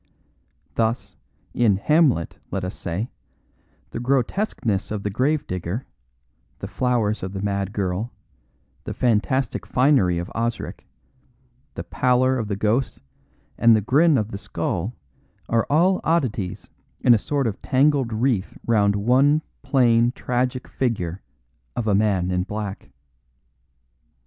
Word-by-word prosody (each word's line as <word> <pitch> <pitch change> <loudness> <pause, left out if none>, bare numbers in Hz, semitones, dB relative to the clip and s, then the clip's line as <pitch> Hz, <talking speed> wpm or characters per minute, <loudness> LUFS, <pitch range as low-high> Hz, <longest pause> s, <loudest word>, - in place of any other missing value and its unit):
Thus, 110 -4 -1 0.4
in 115 -5 +3
Hamlet, 145 - +2
let - - -3
us 90 - -4
say, 95 +7 -4 0.8
the - - -4
grotesqueness 125 - 0
of 105 -2 -4
the 105 - -2
grave 140 +8 +1
digger, 90 +7 -4 0.7
the - - -6
flowers 120 -4 0
of 95 +1 -5
the 95 - -4
mad 100 -1 -1
girl, 100 +3 -2 0.7
the - - -5
fantastic 125 +2 +1
finery 125 -10 +3
of 85 +1 -4
Osric, 115 +1 -3 0.9
the - - -4
pallor 130 -1 +2
of 110 - -3
the 100 - -2
ghost 110 +6 0 0.6
and 115 -1 +6
the - - +3
grin 145 - +4
of 110 -2 -1
the 100 - -5
skull 95 +2 -3 0.5
are 115 -1 +1
all 175 +6 +3
oddities 125 - -1 0.3
in 120 - +6
a 115 - +4
sort 140 +4 -1
of 110 -3 -3
tangled 135 -2 +2
wreath 110 -3 0
round 100 -3 +3
one 135 +8 +3 0.2
plain 120 -4 +3
tragic 125 +1 -2
figure 100 -9 -2 0.5
of 120 - -2
a 105 - +2
man 100 -3 +2
in 90 0 +1
black. 105 +1 -5
115 Hz, 130 wpm, -23 LUFS, 100-130 Hz, 0.9 s, and